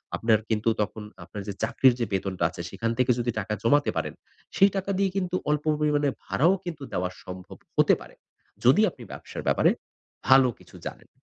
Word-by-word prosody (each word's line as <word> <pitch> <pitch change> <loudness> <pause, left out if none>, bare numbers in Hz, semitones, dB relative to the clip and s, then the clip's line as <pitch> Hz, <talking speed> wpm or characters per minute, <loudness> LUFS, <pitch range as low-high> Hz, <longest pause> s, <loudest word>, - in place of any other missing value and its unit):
আপনার 110 -2 +3
কিন্তু, 110 +1 +1
তখন 105 +2 -3 0.2
আপনার 100 +4 -8
যে 100 - -3
চাকরির 130 -2 +4
যে 120 - +1
বেতনটা 95 -2 -1
আছে 85 - -8
সেখান 115 +5 -2
থেকে 125 0 +3
যদি 120 0 0
টাকা 105 +1 -3
জমাতে 145 +5 +3
পারেন। - - -2 0.4
সেই 195 - +7
টাকা 195 0 -1
দিয়ে 195 0 +2
কিন্তু 185 -1 -1
অল্প 150 0 +1 0.2
পরিমাণে 150 -1 +2 0.2
ভাড়াও 170 +7 +3
কিন্তু 165 -5 -6
দেওয়া 90 0 0
সম্ভব 90 0 -9 0.2
হতে - - +5
পারে। - - -13 0.5
যদি 135 - +6
আপনি 130 -7 -13
ব্যবসার - - -8
ব্যাপারে - - +4 0.6
ভালো 130 0 +7
কিছু - - -17
জানেন। - - -8
125 Hz, 180 wpm, -26 LUFS, 105-150 Hz, 0.6 s, সেই